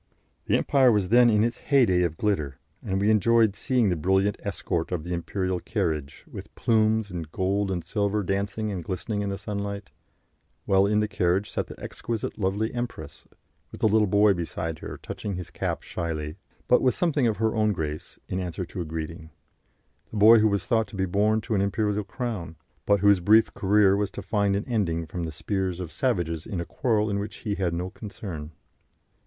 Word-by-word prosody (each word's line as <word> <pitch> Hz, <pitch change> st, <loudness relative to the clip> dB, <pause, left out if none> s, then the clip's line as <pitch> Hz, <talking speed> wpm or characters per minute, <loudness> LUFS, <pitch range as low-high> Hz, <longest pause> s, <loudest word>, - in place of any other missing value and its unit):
The -, -, +3 dB
Empire 130 Hz, -3 st, +4 dB
was 100 Hz, -4 st, +1 dB
then 120 Hz, +1 st, +6 dB
in 105 Hz, -1 st, +3 dB
its 120 Hz, +1 st, -1 dB
heyday 120 Hz, -11 st, +3 dB
of 85 Hz, -2 st, -1 dB
glitter, 75 Hz, -11 st, -1 dB, 0.3 s
and 95 Hz, 0 st, -1 dB
we 100 Hz, -, 0 dB
much 110 Hz, -, +5 dB
enjoyed 110 Hz, 0 st, +4 dB
seeing 125 Hz, -1 st, +1 dB
the 90 Hz, -, +1 dB
brilliant 95 Hz, +5 st, +2 dB
escort 90 Hz, -4 st, -3 dB
of 85 Hz, -4 st, -2 dB
the 90 Hz, +1 st, -4 dB
imperial 95 Hz, +1 st, -2 dB
carriage, 75 Hz, -5 st, -3 dB
with -, -, -10 dB
plumes 110 Hz, -2 st, +2 dB
and 80 Hz, -4 st, -6 dB
gold 95 Hz, +3 st, 0 dB
and 90 Hz, -3 st, -3 dB
silver 105 Hz, 0 st, 0 dB
dancing 100 Hz, +3 st, -2 dB
and 90 Hz, -4 st, -4 dB
glistening 100 Hz, +4 st, -3 dB
in 100 Hz, -, -2 dB
the 100 Hz, -, -3 dB
sunlight, 100 Hz, -1 st, -5 dB, 0.7 s
while 95 Hz, 0 st, +4 dB
in 105 Hz, +1 st, +2 dB
the 105 Hz, -, 0 dB
carriage 100 Hz, -1 st, 0 dB
sat -, -, -2 dB
the -, -, -11 dB
exquisitely 115 Hz, -2 st, -5 dB
lovely 105 Hz, +4 st, 0 dB
empress, 120 Hz, -12 st, -6 dB, 0.4 s
with -, -, -11 dB
the -, -, +5 dB
little 105 Hz, 0 st, +3 dB
boy 100 Hz, +1 st, +5 dB
beside 80 Hz, -2 st, -4 dB
her, -, -, -7 dB
touching 100 Hz, -3 st, -5 dB
his 90 Hz, -1 st, -7 dB
cap -, -, -3 dB
shyly, 80 Hz, -2 st, -4 dB, 0.3 s
but 125 Hz, -, +5 dB
with 130 Hz, -, +2 dB
something 150 Hz, -8 st, +1 dB
of 110 Hz, -, 0 dB
her 110 Hz, 0 st, +1 dB
own 110 Hz, -1 st, +2 dB
grace, 75 Hz, -5 st, -5 dB
in 90 Hz, -, -2 dB
answer 90 Hz, 0 st, -4 dB
to 90 Hz, +2 st, -6 dB
a -, -, -3 dB
greeting 80 Hz, 0 st, -6 dB, 0.8 s
the 110 Hz, -, -6 dB
boy 110 Hz, +2 st, +8 dB
who 110 Hz, -, +4 dB
was 100 Hz, -3 st, 0 dB
thought 115 Hz, -2 st, +1 dB
to -, -, -12 dB
be 95 Hz, -1 st, 0 dB
born 105 Hz, +4 st, +2 dB
to 115 Hz, -, -3 dB
an 100 Hz, -, +2 dB
imperial 105 Hz, +1 st, 0 dB
crown, 100 Hz, -, -5 dB, 0.3 s
but 100 Hz, -2 st, +4 dB
whose 100 Hz, -2 st, +5 dB
brief 110 Hz, +5 st, +4 dB
career 100 Hz, 0 st, +4 dB
was 100 Hz, -1 st, 0 dB
to -, -, -8 dB
find 100 Hz, -2 st, +1 dB
an 100 Hz, -, -2 dB
ending 90 Hz, -9 st, 0 dB
from 85 Hz, +1 st, -4 dB
the 80 Hz, -, -4 dB
spears 95 Hz, +2 st, -2 dB
of 90 Hz, -4 st, -5 dB
savages 85 Hz, -, -1 dB
in 100 Hz, -6 st, -3 dB
a 85 Hz, -, -3 dB
quarrel 110 Hz, -, 0 dB
in 100 Hz, -1 st, -1 dB
which 105 Hz, +1 st, -5 dB
he 105 Hz, -, 0 dB
had 95 Hz, -3 st, -1 dB
no 90 Hz, +2 st, -3 dB
concern. 90 Hz, -8 st, -7 dB
100 Hz, 205 wpm, -26 LUFS, 90-110 Hz, 0.8 s, boy